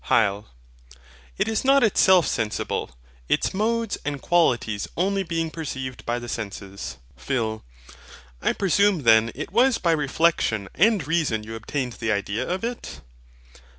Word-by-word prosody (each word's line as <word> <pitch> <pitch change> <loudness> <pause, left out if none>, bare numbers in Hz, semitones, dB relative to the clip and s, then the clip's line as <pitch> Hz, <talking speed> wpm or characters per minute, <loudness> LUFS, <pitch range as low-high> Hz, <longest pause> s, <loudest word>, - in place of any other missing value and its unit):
HYL. 105 -1 +2 0.9
It - - +1
is 220 -1 0
not 275 0 +5
itself 190 -5 +5
sensible; 110 -1 -2 0.4
its - - +1
modes 225 +2 -1
and 145 -1 -3
qualities 120 -11 +1
only 195 +3 +1
being 165 -3 -2
perceived 130 -6 -6
by 120 +1 0
the 120 0 -7
senses. 100 - -6 0.2
PHIL. 110 - -2 0.8
I - - +1
presume 195 -3 +2
then 115 0 +5
it 145 - -6
was 255 +1 +4
by 170 - +1
reflexion 150 - +1
and 205 -5 +3
reason 150 -10 0
you 110 +1 -8
obtained 125 +3 -3
the 115 -1 0
idea 100 +1 -2
of 185 +3 -2
it? 240 +1 -5
145 Hz, 140 wpm, -24 LUFS, -, 0.9 s, not